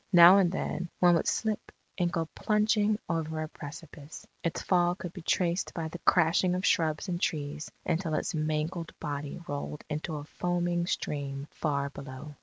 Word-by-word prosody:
Now 175 +3 +10
and 180 -3 +3
then, 180 -2 -3
one 175 -1 +6
would 165 - +2
slip 220 -2 -1 0.2
and 175 -2 +1
go 165 -1 0
plunging 210 0 +2
over 160 -1 -1
a - - -4
precipice; 150 0 -10 0.2
its 170 - -2
fall 175 -1 +3
could 180 -2 -7
be 185 - -8
traced 175 +2 0
by 160 -2 -2
the 175 - -7
crashing 175 +1 +3
of 185 - -1
shrubs 155 +1 +2
and 175 -1 -2
trees 150 0 -2 0.2
until 165 -2 0
its - - -1
mangled 155 +2 -2
body 145 +1 -4
rolled 145 +1 -4
into 155 +1 -2
a 145 - -5
foaming 175 +2 -1
stream 140 -4 -3
far 140 -2 -1
below. 140 +2 -8
165 Hz, 170 wpm, -30 LUFS, 150-175 Hz, 0.2 s, Now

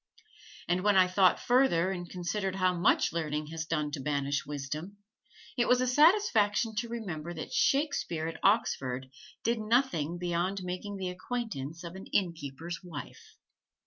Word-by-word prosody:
And 180 +1 +1
when 205 +1 +3
I 185 -1 +7
thought 185 0 +4
further 240 -9 +3
and 175 -2 -5
considered 190 +2 -2
how 185 -1 +2
much 175 -2 +2
learning 155 -2 -2
has 165 -1 -4
done 150 -2 -1
to 145 - -4
banish 140 0 -1
wisdom, 150 +7 -5 0.6
it 240 -2 +1
was 250 - +5
a 255 - +2
satisfaction 250 - +4
to 235 +2 -1
remember 175 -8 -5
that 155 - -6
Shakespeare 275 - +1
at 165 - -5
Oxford 135 - +1 0.3
did 230 0 +1
nothing 215 - +1
beyond 175 +2 -1
making 185 +3 -5
the 185 -1 -3
acquaintance 180 - -5
of 170 0 -7
an 190 +1 -9
inn 180 -4 +1
keeper's 160 +3 -7
wife. 165 -5 -9
180 Hz, 155 wpm, -30 LUFS, 160-210 Hz, 0.6 s, I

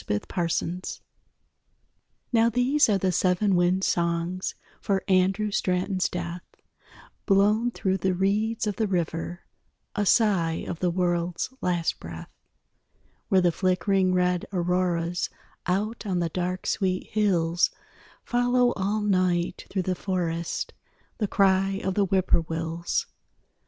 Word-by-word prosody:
SEVEN 105 0 0 0.2
WIND 175 - +1
SONGS 180 +3 -3 1.3
_Now 230 0 +4
these 250 +4 +3
are 205 - +3
the 190 -1 +1
seven 185 +3 +2
wind 180 +2 +2
songs 170 +1 -1 0.3
For 195 -1 0
Andrew 195 +2 +2
Straton's 185 0 0
death, 175 0 -4 0.9
Blown 210 +4 +4
through 190 -5 -1
the 190 0 0
reeds 215 +5 0
of 210 -2 -2
the 220 - +1
river, 175 -1 -2 0.5
A 205 -2 0
sigh 180 -8 +2
of 170 - -4
the 180 - +1
world's 175 +4 -1
last 175 -2 0
breath,_ 80 0 -9 1.0
_Where 190 -2 +5
the 175 - +4
flickering 185 +1 +1
red 180 -1 +1
auroras 175 -1 0 0.4
Out 210 +5 -1
on 185 -2 0
the 170 -1 0
dark 180 +2 -3
sweet 185 -1 -1
hills 175 -5 +2 0.5
Follow 245 0 +2
all 205 +2 -1
night 185 -3 0
through 190 -2 -1
the 185 - 0
forest 170 -3 -2 0.5
The 210 - +1
cry 195 0 +2
of 190 - 0
the 200 +1 +2
whip 190 0 0
poor - - +5
wills. 165 +1 -2
185 Hz, 130 wpm, -26 LUFS, 175-200 Hz, 1.3 s, Where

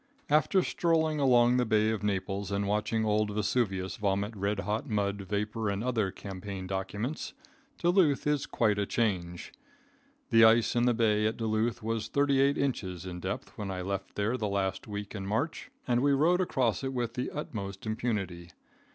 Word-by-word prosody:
After 165 +5 +4
strolling 160 -2 +1
along 125 -2 +5
the 125 - +3
Bay 110 0 +3
of 110 - -2
Naples 100 -1 -2
and 100 0 0
watching 105 +2 0
old 105 0 +1
Vesuvius 100 -2 -1
vomit 100 +1 0
red 100 0 -1
hot 105 +8 -2
mud, 100 -2 -1
vapor 105 +2 -2
and 100 +2 -2
other 115 -6 0
campaign 95 0 -7
documents, 100 +9 -4 0.4
Duluth 175 -5 +3
is 150 -1 +1
quite 105 -3 +1
a 100 - 0
change. 90 -7 -2 0.8
The 115 -1 +7
ice 110 +1 +5
in 120 +1 +3
the 120 - +3
bay 105 -2 +2
at 110 - -2
Duluth 115 +1 -1
was 115 0 -2
thirty 140 0 +2
eight 140 +1 +3
inches 95 -10 -2
in 90 -1 -6
depth 95 +3 -5
when 100 -2 -3
I 95 -1 -3
left 100 +1 -4
there 110 +5 0
the 105 -4 -2
last 95 -1 -2
week 100 -1 -6
in 95 -3 -5
March, 140 +11 -2 0.2
and 120 -1 +2
we 140 +1 +3
rode 170 +6 +3
across 130 - 0
it 135 0 -2
with 120 -2 -2
the 125 0 -2
utmost 100 -9 -6
impunity. 100 -6 -3
110 Hz, 175 wpm, -30 LUFS, 100-125 Hz, 0.8 s, The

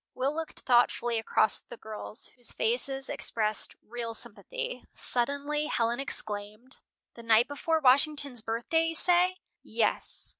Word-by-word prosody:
Will 265 +3 0
looked 325 0 -5
thoughtfully 240 -1 +3
across 220 -1 +2
at - - -44
the 240 - -8
girls, 215 0 -6
whose 245 -2 -10
faces 265 +4 0
expressed 215 -2 0
real 230 0 -5
sympathy. - - -4
Suddenly 285 +4 -1
Helen 235 -4 0
exclaimed: 215 -1 -1 0.3
"The 235 - -11
night 230 0 +4
before 320 +3 0
Washington's 280 -2 +4
birthday, 235 +10 0
you 330 - -1
say?" 360 +2 +3 0.2
"Yes." - - -1
250 Hz, 135 wpm, -29 LUFS, 230-300 Hz, 0.3 s, night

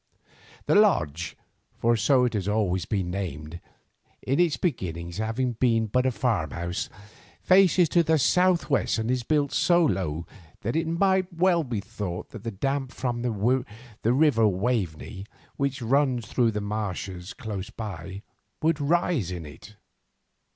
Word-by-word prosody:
The - - +2
Lodge, 85 - +2 0.4
for 115 +1 +2
so 125 +3 +3
it 120 - -1
has 100 -3 -2
always 95 -4 0
been 95 -5 -1
named, 85 -4 -5 0.6
in 135 +4 0
its 175 -4 +3
beginnings 85 - -3
having 115 +3 -1
been 115 -1 +2
but 125 +4 +1
a - - +2
farmhouse, 90 - -2 0.5
faces 185 -2 +5
to 175 - +4
the 160 -1 +2
south 180 +5 +3
west, 140 -4 +1
and 110 +2 -1
is 130 -1 0
built 145 +2 +1
so 175 -2 +4
low 85 - -1 0.4
that 115 +7 -2
it 160 0 0
might 190 +2 +2
well 175 0 +2
be 120 -7 -3
thought 100 -4 -6
that 110 - -9
the 115 - -3
damp 135 +5 -2
from 120 -3 -3
the 125 - 0 0.8
river 130 -5 +4
Waveney, 100 -2 -2 0.3
which 135 -2 -1
runs 130 -1 +2
through 120 0 +1
the 105 -1 -2
marshes 100 -3 -4
close 105 -7 -6
by, 95 -2 -7 0.4
would 160 -1 +2
rise 160 - +1
in 90 -3 -5
it. 75 +8 -12
115 Hz, 150 wpm, -26 LUFS, 95-145 Hz, 0.8 s, faces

